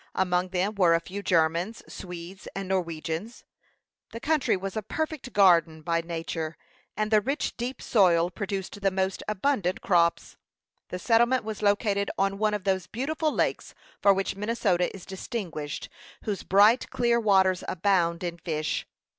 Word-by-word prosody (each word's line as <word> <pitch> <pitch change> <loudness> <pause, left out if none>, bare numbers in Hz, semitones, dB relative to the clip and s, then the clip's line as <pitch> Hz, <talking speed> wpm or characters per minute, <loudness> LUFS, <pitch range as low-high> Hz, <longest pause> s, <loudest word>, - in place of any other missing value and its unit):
Among 180 -1 +1
them 190 +3 0
were 180 -5 +4
a - - +2
few 195 +4 -7
Germans, 170 +4 +1
Swedes, 180 +1 -9
and 195 -1 -4
Norwegians. 170 +3 -3 0.7
The 230 - -5
country 295 -5 +1
was 195 0 -5
a 220 - -1
perfect 310 +3 -4
garden 170 -5 +4
by 165 +1 0
nature, 165 -1 -4 0.4
and 215 0 -1
the 215 -1 +5
rich, 275 +7 -2
deep 245 +3 -5
soil 175 -5 +3
produced 200 0 -5
the 195 - +3
most 190 0 -1
abundant 210 -3 0
crops. 170 -5 +1 0.5
The 180 - -4
settlement 235 +5 +3
was 215 -1 -5
located 205 -1 +1
on 195 0 0
one 215 -1 +2
of 205 - -5
those 190 -2 0
beautiful 305 - -1
lakes - - -1 0.3
for 200 - +6
which 195 0 0
Minnesota 200 -4 0
is 190 - -10
distinguished, 185 - -5 0.4
whose 205 -3 -3
bright, 210 +6 +4
clear 240 -2 +2
waters 190 -4 +3
abound 175 -2 +1
in 170 -1 -4
fish. 155 -3 -2
195 Hz, 155 wpm, -27 LUFS, 175-215 Hz, 0.7 s, for